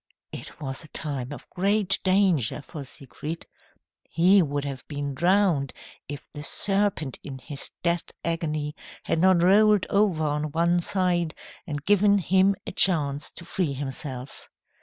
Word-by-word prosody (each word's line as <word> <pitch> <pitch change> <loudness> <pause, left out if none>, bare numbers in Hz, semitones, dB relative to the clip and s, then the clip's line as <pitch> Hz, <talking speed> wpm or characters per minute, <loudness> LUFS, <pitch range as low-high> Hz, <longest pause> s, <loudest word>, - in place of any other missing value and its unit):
It - - -8
was 135 0 -5
a - - -11
time 140 -5 -4
of 145 - -9
great 195 +1 +2
danger 185 - +3
for 150 -2 -8
Siegfried. 145 +4 -7 0.6
He 185 +4 +5
would 145 -3 -2
have 135 -2 -5
been 145 -1 -4
drowned 175 -3 +2 0.4
if 145 0 -7
the 145 - -6
serpent 195 -5 +1
in 135 -2 -7
his 135 +2 -8
death 170 0 0 0.2
agony 155 -3 -2 0.3
had - - 0
not 185 -1 +4
rolled 210 +2 +5
over 195 -6 +2
on 150 0 -2
one 170 +2 +2
side 175 -2 0 0.3
and 145 -2 -5
given 205 0 +4
him 190 +1 +3
a - - -4
chance 145 -6 +1
to 170 - -11
free 175 -4 -1
himself. 135 -1 -6
165 Hz, 145 wpm, -26 LUFS, 145-190 Hz, 0.6 s, He